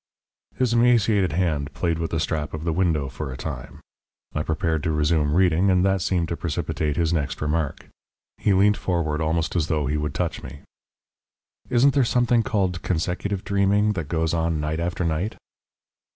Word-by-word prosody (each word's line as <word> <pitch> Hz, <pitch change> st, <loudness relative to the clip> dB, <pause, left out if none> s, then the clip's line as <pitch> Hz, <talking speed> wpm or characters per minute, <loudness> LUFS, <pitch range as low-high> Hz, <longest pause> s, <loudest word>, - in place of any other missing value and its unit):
His 125 Hz, -3 st, +1 dB
emaciated 115 Hz, -7 st, +3 dB
hand 75 Hz, -5 st, 0 dB
played 85 Hz, -1 st, -1 dB
with 80 Hz, -, -2 dB
the 80 Hz, -, -1 dB
strap 75 Hz, -1 st, -2 dB
of 80 Hz, -, -6 dB
the 85 Hz, -1 st, 0 dB
window 80 Hz, -5 st, +1 dB
for 70 Hz, +2 st, -6 dB
a 65 Hz, -, -7 dB
time. 65 Hz, -4 st, -7 dB, 0.5 s
I 75 Hz, -, -1 dB
prepared 80 Hz, 0 st, -1 dB
to 80 Hz, -, -1 dB
resume 75 Hz, -1 st, +1 dB
reading, 90 Hz, +1 st, +3 dB
and 90 Hz, 0 st, +3 dB
that 95 Hz, -1 st, +2 dB
seemed 85 Hz, -2 st, 0 dB
to 85 Hz, -, -1 dB
precipitate 75 Hz, -2 st, -2 dB
his 85 Hz, -1 st, +1 dB
next 75 Hz, -4 st, -2 dB
remark. 75 Hz, -1 st, -2 dB, 0.5 s
He 105 Hz, -, +2 dB
leant 100 Hz, +2 st, +4 dB
forward 80 Hz, -4 st, -1 dB
almost 80 Hz, +2 st, -1 dB
as 80 Hz, -3 st, +1 dB
though 75 Hz, -2 st, 0 dB
he 75 Hz, +3 st, 0 dB
would 75 Hz, 0 st, -3 dB
touch -, -, -2 dB
me. 70 Hz, -, -10 dB, 1.1 s
"Isn't 130 Hz, +3 st, +4 dB
there 135 Hz, -, +3 dB
something 120 Hz, 0 st, +2 dB
called 95 Hz, -5 st, -1 dB
consecutive 90 Hz, +3 st, -2 dB
dreaming 100 Hz, +1 st, +2 dB
that 80 Hz, -7 st, -4 dB
goes 80 Hz, 0 st, 0 dB
on 80 Hz, -1 st, 0 dB
night 75 Hz, +2 st, -2 dB
after 85 Hz, +1 st, -2 dB
night?" 85 Hz, +6 st, -1 dB
85 Hz, 180 wpm, -24 LUFS, 75-95 Hz, 1.1 s, leant